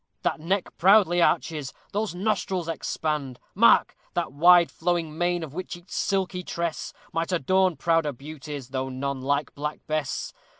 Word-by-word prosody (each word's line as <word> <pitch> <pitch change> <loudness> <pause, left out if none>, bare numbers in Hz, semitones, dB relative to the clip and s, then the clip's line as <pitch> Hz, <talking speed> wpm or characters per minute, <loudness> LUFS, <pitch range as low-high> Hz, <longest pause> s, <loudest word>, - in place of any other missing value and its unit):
That - - 0
neck 185 +4 -2
proudly 185 -2 +5
arches, 150 -4 0 0.2
those 210 -3 -2
nostrils 190 -3 -1
expand! 150 -5 -3
Mark! 230 +4 +5 0.2
that 170 -5 -1
wide 170 +3 +6
flowing 165 -2 -1
mane! 175 0 0
of 150 -3 -8
which 180 +1 -5
each 175 +1 -19
silky 190 -2 -1
tress 170 -2 -3 0.2
Might 165 +2 -1
adorn 185 +2 +2
prouder 165 -2 +1
beauties 145 -1 -8
though 130 0 -3
none 135 +1 -3
like 140 +2 -1
Black 150 +1 -4
Bess. 155 -3 -2
165 Hz, 145 wpm, -26 LUFS, 145-180 Hz, 0.2 s, wide